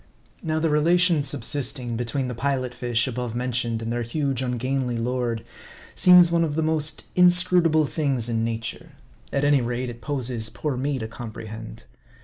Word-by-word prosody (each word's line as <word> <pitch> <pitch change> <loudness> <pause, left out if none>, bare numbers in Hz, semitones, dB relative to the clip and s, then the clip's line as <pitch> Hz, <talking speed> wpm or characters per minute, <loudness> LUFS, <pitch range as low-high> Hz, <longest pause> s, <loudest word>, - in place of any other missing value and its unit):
Now 155 -1 -1
the 160 0 +1
relation 170 +2 +3
subsisting 130 -2 -3
between 120 +3 -2
the 125 - -4
Pilot 130 0 -2
fish 120 -2 0
above 125 -2 -4
mentioned 120 -2 -1
and 115 +1 -3
their 120 - -1
huge 135 +2 -1
ungainly 125 0 -1
lord, 120 -1 -2 0.5
seems 180 -2 +7
one 170 0 +3
of 150 -3 -2
the 160 - 0
most 155 -1 0
inscrutable 180 -3 +4
things 140 -6 -1
in 115 -1 -1
nature. 115 0 -4 0.4
At 140 - 0
any 145 -2 +4
rate, 120 +1 -2
it 120 0 -13
poses 125 -6 -2
poor 130 +5 -3
me 135 +2 -1
to 110 -3 -4
comprehend. 110 - -8
130 Hz, 160 wpm, -24 LUFS, 120-150 Hz, 0.5 s, seems